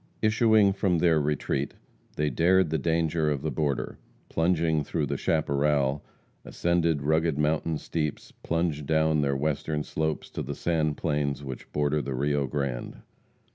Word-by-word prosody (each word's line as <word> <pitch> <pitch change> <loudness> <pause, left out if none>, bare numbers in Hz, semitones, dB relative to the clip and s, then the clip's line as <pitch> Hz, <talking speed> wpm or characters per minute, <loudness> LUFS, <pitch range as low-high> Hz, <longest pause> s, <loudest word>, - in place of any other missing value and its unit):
Issuing 110 -2 +4
from 95 -3 +1
their 80 -2 +3
retreat, 70 -1 -1 0.4
they 75 0 0
dared 90 +4 +3
the 80 - +1
danger 80 0 +1
of 70 -2 -2
the 80 - -1
border, 70 0 -2 0.3
plunged 80 -3 +1
through 80 -3 -1
the - - -2
chaparral, 70 -2 +1 0.4
ascended 85 -4 0
rugged 80 0 +1
mountain 75 +1 0
steeps, 75 -1 -4
plunged 80 -4 -1
down 80 -1 +2
their 70 -1 +1
western 75 +1 -1
slopes 80 0 -3
to - - -4
the - - -4
sand 80 -3 0
plains 75 -3 -1
which 65 -2 -8
border 75 +1 +1
the 65 - -4
Rio 70 +1 0
Grande. 70 -3 -4
75 Hz, 145 wpm, -27 LUFS, 70-80 Hz, 0.4 s, Issuing